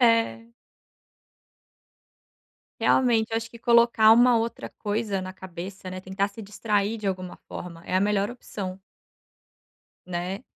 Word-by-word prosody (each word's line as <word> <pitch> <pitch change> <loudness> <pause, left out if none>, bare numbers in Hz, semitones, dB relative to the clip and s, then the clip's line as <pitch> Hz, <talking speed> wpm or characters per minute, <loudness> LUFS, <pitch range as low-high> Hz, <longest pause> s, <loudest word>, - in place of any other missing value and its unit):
É. 230 -1 +3 2.3
Realmente, 230 -3 +3
eu - - +2
acho 225 0 -3
que 235 - -12
colocar 235 -2 +6
uma 240 +1 +6
outra 230 +1 -3
coisa 210 -2 -2
na 185 0 -6
cabeça, 185 +1 -8
né. 185 0 -6
Tentar 190 +2 -1
se 200 +3 -11
distrair 210 +1 -1
de 210 -2 -2
alguma 185 -1 -4
forma, 170 -2 -8
é - - -3
a - - +3
melhor 205 +1 +1
opção. 195 -6 -6 1.3
Né? 180 +4 -3
205 Hz, 130 wpm, -26 LUFS, 185-230 Hz, 2.3 s, colocar